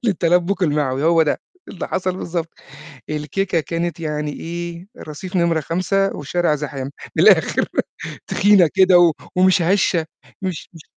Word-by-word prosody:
للتلبُّك 180 -1 +1
المعوي، 145 -3 0
هو 165 0 +4
ده. 150 - -1 0.3
اللي 190 - -6
حصل 185 0 -2
بالضبط 170 -2 -3 0.6
الكيكة 165 +4 -1
كانت 170 +2 -3
يعني 150 -2 -3
إيه؟ 170 +2 -6
رصيف 180 +5 -7
نمرة 170 -2 +2
5 185 +5 0
والشارع 160 +2 0
زحام، 140 -2 -5 0.3
من - - +3
الآخر - - +4 0.6
تخينة 195 -4 +4
كده 180 -3 +6 0.2
ومش 185 -1 +4
هشة 175 -2 +1 0.4
مش 185 -4 -4
مش 160 - -12
170 Hz, 130 wpm, -20 LUFS, 155-185 Hz, 0.6 s, كده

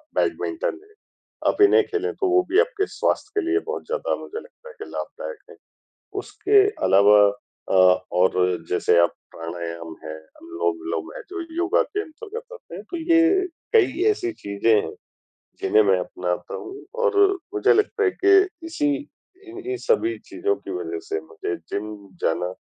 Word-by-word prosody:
Badminton 360 +2 -1
है, 420 +1 -22 0.5
आप - - +1
इन्हें 420 +2 +7
खेलें, 425 +1 -2
तो 390 - 0
वो 365 0 +5
भी 375 - +4
आपके 455 -4 +1
स्वास्थ्य 420 - -1
के 405 - -2
लिए 385 - +3
बहुत 460 +1 -4
ज़्यादा - - -1
मुझे 440 - -6
लगता 485 +1 -15
है 480 - -13
कि - - -6
लाभदायक - - -6
हैं। - - -14 0.6
उसके 405 0 +3 0.2
अलावा 100 +2 +6 0.5
अ, - - 0 0.4
और 90 +1 +3 0.4
जैसे 90 0 +3
अब 85 - +5 0.2
प्राणायाम 85 -1 -6
है, 80 - -6 0.3
अनुलोम-विलोम 350 +1 -3
है, - - -6
जो 390 0 -5 0.2
योगा 360 +5 +2
के 410 - -3
अंतर्गत 450 +8 -9
आते 475 - -11
हैं, 195 - -8
तो 345 - -2
ये 335 +3 +3 0.3
कई 410 -5 +3
ऐसी 370 -4 0
चीज़ें 100 - 0
हैं, - - -6 0.7
जिन्हें 110 - +4
मैं 95 -2 +3
अपनाता 90 -1 -4
हूँ 390 +1 -8 0.2
और 460 -4 +2 0.4
मुझे 410 - +4
लगता 430 +1 +1
है 410 - +4
कि 390 0 +7 0.3
इसी 325 -3 -1 0.6
इन्ही 375 +2 -5
सभी 355 -7 +2
चीज़ों 410 +3 0
की - - -9
वज़ह 390 +1 -4
से 415 0 -1
मुझे 410 -2 -5
जिम 105 - -5 0.3
जाना 90 +2 0
375 Hz, 160 wpm, -23 LUFS, -, 0.7 s, इन्हें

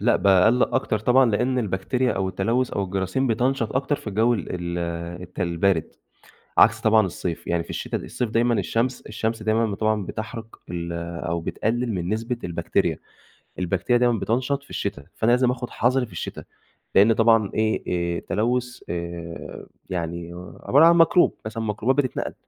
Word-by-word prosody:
لأ 120 +4 +3
باقلّق 100 +5 +4
أكتر 120 -4 +1
طبعًا 125 +2 +4
لإن 125 +5 +1
البكتيريا 120 +5 0
أو 95 0 -1
التلوث 115 +7 0
أو 100 - -1
الجراثيم 95 +7 -1
بتَنشط 120 0 0
أكتر 140 +2 0
في - - -15
الجو 110 +4 +2
ال 100 - -4
ال 85 -1 -3 0.4
الت 90 - -9
البارد، 85 -1 +1 0.7
عكس - - +6
طبعًا 110 -2 +4
الصيف 85 -1 -5
يعني 85 -1 0
في - - -13
الشتا - - -3
الصيف 120 -3 -3
دايمًا 120 +1 +2
الشمس 120 +2 -1
الشمس 110 +1 -3
دايمًا 110 +1 +2
ب 100 - -3
طبعًا 110 -2 0
بتحرق 110 +1 -6 0.2
ال 85 -1 -4 0.3
أو 85 0 -1
بتقلل 115 +7 -1
من 90 -1 -3
نسبة 115 +3 -2
البكتيريا، 85 -2 0 0.6
البكتيريا 105 +7 +1
دايمًا 120 -3 +3
بتَنشط 130 +6 -1
في 140 - -22
الشتا، 100 -9 -4
فأنا 115 +1 +1
لازم 125 0 +4
آخد 125 -1 -4
حذري 125 +1 +1
في - - -18
الشتا، - - -6 0.5
لإن 105 +4 +6
طبعًا 115 -2 +4
إيه 110 0 0 0.3
آآ - - -4
تلوث 125 +2 -1
آآ 85 -1 -6 0.2
يعني 85 -1 -4 0.3
عبارة 145 +5 +5
عن 170 0 +6
ميكروب 165 +2 +5
مثلًا 110 +1 -4
ميكروبات 125 +6 +1
بتتنقل 125 - -3
110 Hz, 165 wpm, -24 LUFS, 95-125 Hz, 0.7 s, عكس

